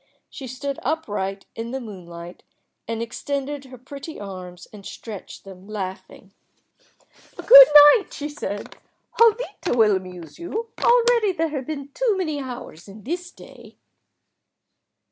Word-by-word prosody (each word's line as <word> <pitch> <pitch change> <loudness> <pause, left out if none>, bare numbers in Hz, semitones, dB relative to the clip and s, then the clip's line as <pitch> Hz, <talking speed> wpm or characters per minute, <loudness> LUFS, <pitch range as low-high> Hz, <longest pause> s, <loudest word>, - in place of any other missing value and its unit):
She 270 - -8
stood 275 +3 -5
upright 205 -11 -3
in 230 +1 -5
the 265 +2 -4
moonlight, 175 -6 -10 0.5
and 230 0 -3
extended 280 +4 -4
her 255 -1 -12
pretty 275 +5 -9
arms 185 -3 -9
and 205 -2 -11
stretched 210 0 -9
them, 190 0 -13
laughing. 195 -2 -7 1.0
"Good - - +10 0.3
night," 415 - -1
she 295 - -5
said. 205 -9 -6 0.4
"Jovita 455 - +2
will 215 -3 +5
amuse 180 - -8
you. 440 +7 -5
Already 475 -4 +4
there 330 -2 -1
have 275 -4 -5
been 280 -3 -5
too 440 - 0
many 310 -6 -2
hours 245 - -9
in 200 +1 -13
this 350 +6 -4
day." - - -15
260 Hz, 130 wpm, -23 LUFS, 195-320 Hz, 1.0 s, Good